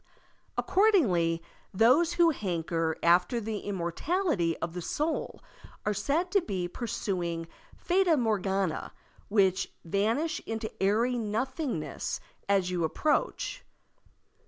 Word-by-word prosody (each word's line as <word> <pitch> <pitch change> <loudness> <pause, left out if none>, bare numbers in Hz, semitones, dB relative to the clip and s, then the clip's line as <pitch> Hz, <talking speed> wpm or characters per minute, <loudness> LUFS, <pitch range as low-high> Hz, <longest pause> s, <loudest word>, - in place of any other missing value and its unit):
Accordingly, 195 - +3 0.3
those 255 - +4
who 345 -1 +5
hanker 165 - -1
after 180 +7 +4
the 215 -1 -3
immortality 190 - -1
of 165 - -4
the 180 - -4
soul 305 - -2 0.4
are 210 - +2
said 290 - 0
to 400 - +4
be 190 - -2
pursuing 175 -5 -3 0.3
fata 360 -3 +3
morgana 195 - 0 0.4
which 195 -3 +2
vanish 225 - 0
into 220 -1 -3
airy 230 +5 +2
nothingness 225 - -2 0.3
as 190 -2 +2
you 175 -2 0
approach. 310 - 0
210 Hz, 105 wpm, -29 LUFS, -, 0.4 s, who